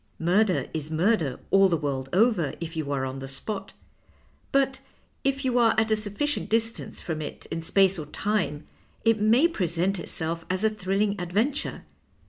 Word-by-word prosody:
Murder 185 Hz, +3 st, +2 dB
is 155 Hz, -1 st, -4 dB
murder 160 Hz, -, +1 dB
all 195 Hz, 0 st, +6 dB
the 170 Hz, -, +2 dB
world 135 Hz, -3 st, -3 dB
over 190 Hz, -, +2 dB
if 170 Hz, -1 st, -5 dB
30U 160 Hz, -3 st, -3 dB
are 135 Hz, -2 st, 0 dB
on 130 Hz, +1 st, -5 dB
the 135 Hz, -, -6 dB
spot. 195 Hz, +9 st, -2 dB, 0.8 s
But 270 Hz, -1 st, +2 dB, 0.4 s
if 275 Hz, 0 st, 0 dB
you 250 Hz, -1 st, +2 dB
are 230 Hz, -2 st, +4 dB
at 220 Hz, 0 st, +1 dB
a -, -, +5 dB
sufficient 215 Hz, +8 st, -2 dB
distance 225 Hz, +1 st, -1 dB
from 160 Hz, -2 st, -4 dB
it 150 Hz, -, -7 dB
in 165 Hz, -, -2 dB
space 190 Hz, +2 st, +3 dB
or 150 Hz, -, -6 dB
time, 175 Hz, -4 st, -1 dB, 0.4 s
it 225 Hz, -2 st, +3 dB
may 235 Hz, +9 st, +5 dB
present 185 Hz, -, -1 dB
itself 165 Hz, 0 st, -3 dB
as 185 Hz, +2 st, -1 dB
a 220 Hz, -, +3 dB
thrilling 200 Hz, 0 st, -1 dB
adventure. 215 Hz, +12 st, -1 dB
195 Hz, 170 wpm, -26 LUFS, 160-220 Hz, 0.8 s, all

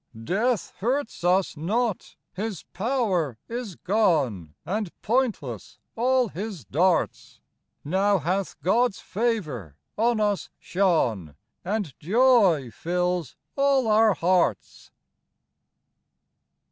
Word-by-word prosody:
Death 215 Hz, -, 0 dB
hurts 245 Hz, 0 st, -2 dB
us 180 Hz, +1 st, +2 dB
not: 210 Hz, +7 st, -2 dB, 0.2 s
his 205 Hz, -2 st, -4 dB
power 190 Hz, -, 0 dB
is 230 Hz, -5 st, -5 dB
gone, 145 Hz, -, 0 dB
And 200 Hz, +3 st, -2 dB
pointless 245 Hz, 0 st, -1 dB, 0.2 s
all 250 Hz, 0 st, +2 dB
his 190 Hz, -, -6 dB
darts; 170 Hz, -, 0 dB, 0.5 s
Now 195 Hz, +6 st, +2 dB
hath 180 Hz, +2 st, -2 dB
God's 225 Hz, +4 st, +2 dB
favor 165 Hz, -, -2 dB, 0.2 s
on 230 Hz, +1 st, +2 dB
us 205 Hz, -2 st, 0 dB
shone, 120 Hz, -, 0 dB, 0.3 s
And 195 Hz, -6 st, -2 dB
joy 195 Hz, -, +4 dB
fills 180 Hz, 0 st, -2 dB, 0.2 s
all 275 Hz, -3 st, +3 dB
our 215 Hz, -1 st, +4 dB
hearts. 180 Hz, 0 st, 0 dB
195 Hz, 95 wpm, -25 LUFS, 170-225 Hz, 0.5 s, joy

